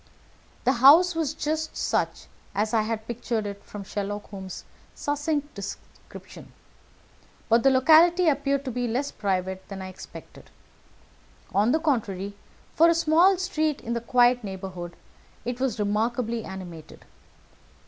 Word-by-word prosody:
The 255 Hz, -, +4 dB
house 295 Hz, +9 st, +7 dB
was 315 Hz, -3 st, -2 dB
just 315 Hz, +1 st, -3 dB
such -, -, -1 dB, 0.3 s
as 215 Hz, +3 st, 0 dB
I 225 Hz, -, +4 dB
had 220 Hz, 0 st, -3 dB
pictured 235 Hz, -2 st, -3 dB
it 200 Hz, 0 st, -6 dB
from 205 Hz, -1 st, -8 dB
Sherlock 205 Hz, +1 st, -5 dB
Holmes's 190 Hz, -2 st, -7 dB, 0.3 s
succinct 290 Hz, 0 st, -2 dB
description, 200 Hz, -1 st, -10 dB, 1.0 s
but 230 Hz, +1 st, +5 dB
the 270 Hz, -, +5 dB
locality 325 Hz, +7 st, +5 dB
appeared 280 Hz, -1 st, +1 dB
to 260 Hz, -, -3 dB
be 245 Hz, +1 st, -2 dB
less 255 Hz, +5 st, -1 dB
private 190 Hz, -2 st, -2 dB
than 195 Hz, -1 st, -7 dB
I 190 Hz, 0 st, -6 dB
expected. 185 Hz, -, -12 dB, 1.0 s
On 210 Hz, +4 st, +3 dB
the 315 Hz, -, +3 dB
contrary, 205 Hz, -, -1 dB, 0.4 s
for 330 Hz, +2 st, +5 dB
a 335 Hz, -, +3 dB
small 335 Hz, +4 st, +4 dB
street 315 Hz, -5 st, -1 dB
in 235 Hz, +1 st, -4 dB
a 235 Hz, -, -2 dB
quiet 245 Hz, 0 st, +3 dB
neighbourhood, 185 Hz, -3 st, -7 dB, 0.5 s
it 245 Hz, +1 st, -3 dB
was 260 Hz, -4 st, -1 dB
remarkably 225 Hz, +2 st, -1 dB
animated. 175 Hz, -5 st, -9 dB
235 Hz, 140 wpm, -26 LUFS, 200-290 Hz, 1.0 s, house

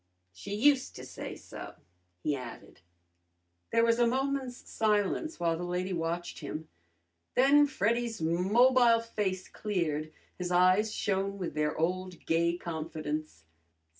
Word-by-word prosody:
"She 145 Hz, -, -6 dB
used 265 Hz, +4 st, +3 dB
to -, -, -8 dB
say -, -, -7 dB
so," -, -, -9 dB, 0.5 s
he 150 Hz, -, +1 dB
added. 120 Hz, -9 st, -9 dB, 0.9 s
There 230 Hz, -, +4 dB
was 230 Hz, 0 st, +3 dB
a 240 Hz, -, +5 dB
moment's 265 Hz, 0 st, -1 dB
silence, 215 Hz, -, 0 dB
while 170 Hz, -1 st, +1 dB
the 170 Hz, -, -5 dB
lady 180 Hz, +1 st, -2 dB
watched 170 Hz, +1 st, -3 dB
him. 155 Hz, +1 st, -6 dB, 0.7 s
Then 285 Hz, +3 st, +6 dB
Freddy's 230 Hz, 0 st, 0 dB
mobile 230 Hz, +8 st, +4 dB
face 200 Hz, -5 st, -2 dB
cleared, 155 Hz, -7 st, -2 dB, 0.3 s
his 180 Hz, -1 st, -2 dB
eyes 185 Hz, +4 st, +4 dB
shone 195 Hz, -1 st, -1 dB
with 180 Hz, -3 st, -4 dB
their 150 Hz, 0 st, -1 dB
old 180 Hz, +1 st, -2 dB
gay 170 Hz, +1 st, +2 dB
confidence. 155 Hz, -, -5 dB
185 Hz, 130 wpm, -30 LUFS, 165-230 Hz, 0.9 s, Then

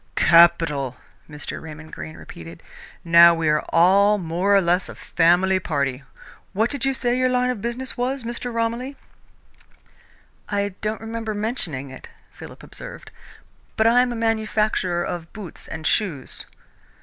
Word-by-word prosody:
"Capital!" 165 Hz, -6 st, +4 dB, 0.3 s
Mr. 150 Hz, -1 st, -6 dB
Raymond 155 Hz, 0 st, -11 dB
Greene 155 Hz, -, -8 dB
repeated. 85 Hz, 0 st, -11 dB, 0.4 s
"Now 170 Hz, 0 st, +7 dB
we 165 Hz, -1 st, -1 dB
are 150 Hz, 0 st, +2 dB
all 200 Hz, +5 st, +4 dB
more 180 Hz, +3 st, +1 dB
or -, -, +6 dB
less 180 Hz, 0 st, +1 dB
a -, -, -9 dB
family 180 Hz, +3 st, +2 dB
party. 140 Hz, -6 st, -2 dB, 0.5 s
What 220 Hz, +4 st, +1 dB
did 280 Hz, -2 st, -3 dB
you 270 Hz, 0 st, +1 dB
say 245 Hz, -1 st, 0 dB
your 255 Hz, 0 st, +2 dB
line 250 Hz, 0 st, +1 dB
of 230 Hz, -5 st, -6 dB
business 240 Hz, +3 st, -4 dB
was, 255 Hz, +1 st, -2 dB
Mr. 240 Hz, +1 st, -4 dB
Romilly?" 235 Hz, +4 st, -2 dB, 1.5 s
"I 205 Hz, -1 st, 0 dB
don't 215 Hz, +1 st, -3 dB
remember 225 Hz, -1 st, -4 dB
mentioning 195 Hz, -, -3 dB
it," 130 Hz, -, -11 dB, 0.2 s
Philip -, -, -12 dB
observed, -, -, -10 dB, 0.7 s
"but 220 Hz, -, +3 dB
I 235 Hz, +2 st, +5 dB
am 250 Hz, -1 st, 0 dB
a -, -, -4 dB
manufacturer 215 Hz, -5 st, 0 dB
of 165 Hz, -2 st, -5 dB
boots 205 Hz, -6 st, -10 dB
and 160 Hz, 0 st, -7 dB
shoes." 170 Hz, -11 st, -2 dB
200 Hz, 150 wpm, -22 LUFS, 165-230 Hz, 1.5 s, Now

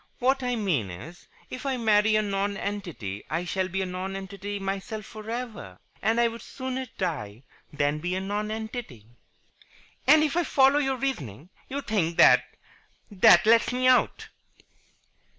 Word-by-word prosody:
What 265 Hz, +2 st, +1 dB
I 250 Hz, -1 st, -1 dB
mean 170 Hz, -, 0 dB
is, 150 Hz, -, -10 dB, 0.2 s
if 255 Hz, -, -6 dB
I 270 Hz, -2 st, -1 dB
marry 215 Hz, -2 st, +3 dB
a 215 Hz, -, +3 dB
nonentity 195 Hz, -, -3 dB
I 165 Hz, +3 st, -2 dB
shall 185 Hz, +1 st, -1 dB
be 190 Hz, +1 st, -2 dB
a -, -, -2 dB
nonentity 195 Hz, +2 st, -5 dB
myself 195 Hz, +2 st, -4 dB
for 215 Hz, 0 st, -10 dB
ever. 235 Hz, -2 st, -6 dB, 0.2 s
And 225 Hz, +2 st, +2 dB
I 235 Hz, -, +4 dB
would 230 Hz, 0 st, -7 dB
sooner 260 Hz, +1 st, -5 dB
die 130 Hz, -, -4 dB, 0.3 s
than 145 Hz, +1 st, 0 dB
be 180 Hz, +3 st, -2 dB
a -, -, -1 dB
nonentity." 210 Hz, -, -5 dB, 1.0 s
"And, 305 Hz, +3 st, +7 dB
if 305 Hz, 0 st, 0 dB
I 350 Hz, -, +2 dB
follow 275 Hz, -1 st, +4 dB
your 270 Hz, -2 st, 0 dB
reasoning, 160 Hz, -, -4 dB, 0.2 s
you 280 Hz, +2 st, -3 dB
think 185 Hz, -9 st, -1 dB
that -, -, +7 dB, 0.7 s
that 185 Hz, -2 st, +6 dB
lets 230 Hz, +2 st, +4 dB
me 255 Hz, +1 st, +1 dB
out?" 255 Hz, -1 st, +2 dB
205 Hz, 150 wpm, -26 LUFS, 180-245 Hz, 1.0 s, And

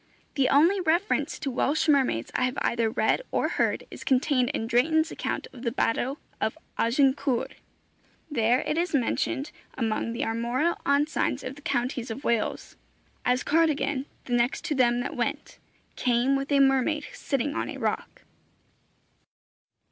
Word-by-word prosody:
The 275 Hz, -3 st, +2 dB
only 335 Hz, +8 st, +4 dB
reference 350 Hz, +4 st, +1 dB
to 275 Hz, -, -3 dB
Welsh 285 Hz, +6 st, +1 dB
mermaids 265 Hz, -, +2 dB
I 255 Hz, -, +1 dB
have 255 Hz, -, -3 dB
either 230 Hz, -1 st, +1 dB
read 220 Hz, -, +1 dB
or -, -, 0 dB
heard -, -, 0 dB
is -, -, -9 dB
contained 255 Hz, -1 st, +2 dB
in 290 Hz, -6 st, -2 dB
Drayton's 315 Hz, +8 st, +2 dB
account -, -, -3 dB
of 250 Hz, -, -11 dB
the 235 Hz, -2 st, -1 dB
Battle 250 Hz, +3 st, 0 dB, 0.2 s
of 220 Hz, -, -1 dB, 0.2 s
Agincourt. 265 Hz, +1 st, +1 dB, 0.7 s
There 245 Hz, -3 st, +2 dB
it 310 Hz, -, -1 dB
is 345 Hz, -2 st, 0 dB
mentioned, 270 Hz, +2 st, -1 dB, 0.3 s
among 230 Hz, -1 st, -1 dB
the 255 Hz, +5 st, -2 dB
armorial 240 Hz, +9 st, 0 dB
ensigns 285 Hz, +2 st, +1 dB
of 255 Hz, -, -5 dB
the 290 Hz, -, -14 dB
counties 250 Hz, -5 st, -2 dB
of 250 Hz, +6 st, -6 dB
Wales: 230 Hz, -2 st, -1 dB, 0.5 s
As 250 Hz, +1 st, +2 dB
Cardigan, 295 Hz, -3 st, +1 dB, 0.2 s
the 245 Hz, -, -3 dB
next 240 Hz, +5 st, +1 dB
to -, -, 0 dB
them 245 Hz, -3 st, +3 dB
that 265 Hz, -, -4 dB
went, -, -, -3 dB, 0.4 s
Came 250 Hz, +2 st, +2 dB
with 275 Hz, +1 st, -3 dB
a 280 Hz, -, +4 dB
mermaid 275 Hz, +3 st, +3 dB
sitting 280 Hz, +1 st, -2 dB
on -, -, -2 dB
a -, -, -6 dB
rock. -, -, -3 dB
265 Hz, 155 wpm, -27 LUFS, 240-295 Hz, 0.7 s, only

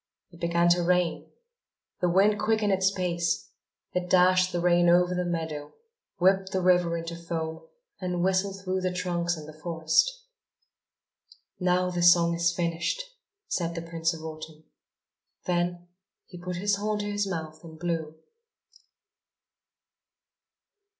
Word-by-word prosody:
It 170 Hz, -, -16 dB
began 170 Hz, 0 st, +2 dB
to 175 Hz, 0 st, +4 dB
rain. 180 Hz, 0 st, 0 dB, 0.7 s
The 180 Hz, -, +1 dB
wind 200 Hz, +4 st, +3 dB
quickened 215 Hz, -2 st, +1 dB
its 190 Hz, 0 st, +3 dB
pace: 170 Hz, -3 st, -2 dB, 0.4 s
it 180 Hz, 0 st, -2 dB
dashed 185 Hz, 0 st, +4 dB
the 175 Hz, -, -1 dB
rain 175 Hz, 0 st, +4 dB
over 180 Hz, +1 st, +4 dB
the 180 Hz, 0 st, -1 dB
meadow, 160 Hz, -4 st, -4 dB, 0.4 s
whipped 190 Hz, +1 st, +3 dB
the 190 Hz, -, 0 dB
river 175 Hz, -2 st, +3 dB
into 165 Hz, 0 st, -5 dB
foam 165 Hz, -, -5 dB, 0.3 s
and 180 Hz, -2 st, -2 dB
whistled 190 Hz, +1 st, 0 dB
through 185 Hz, 0 st, -1 dB
the 185 Hz, 0 st, 0 dB
trunks 175 Hz, -1 st, -1 dB
in 155 Hz, -, -9 dB
the 155 Hz, -, -10 dB
forest. 160 Hz, -, +1 dB, 1.5 s
"Now 180 Hz, 0 st, +1 dB
the 175 Hz, -1 st, -2 dB
song 170 Hz, -1 st, +6 dB
is 170 Hz, +1 st, +2 dB
finished!" 170 Hz, -, -2 dB, 0.4 s
said 170 Hz, -1 st, -2 dB
the 165 Hz, -, -3 dB
Prince 165 Hz, 0 st, -1 dB
of 160 Hz, -2 st, -8 dB
Autumn. 155 Hz, 0 st, -9 dB, 0.8 s
Then 175 Hz, 0 st, -1 dB, 0.4 s
he 180 Hz, -, -12 dB
put 180 Hz, 0 st, -4 dB
his 200 Hz, +3 st, +1 dB
horn 210 Hz, +1 st, -1 dB
to -, -, -4 dB
his 205 Hz, 0 st, -1 dB
mouth 160 Hz, -4 st, -5 dB
and 160 Hz, -1 st, -11 dB
blew. 160 Hz, -2 st, -3 dB
175 Hz, 140 wpm, -27 LUFS, 170-185 Hz, 1.5 s, song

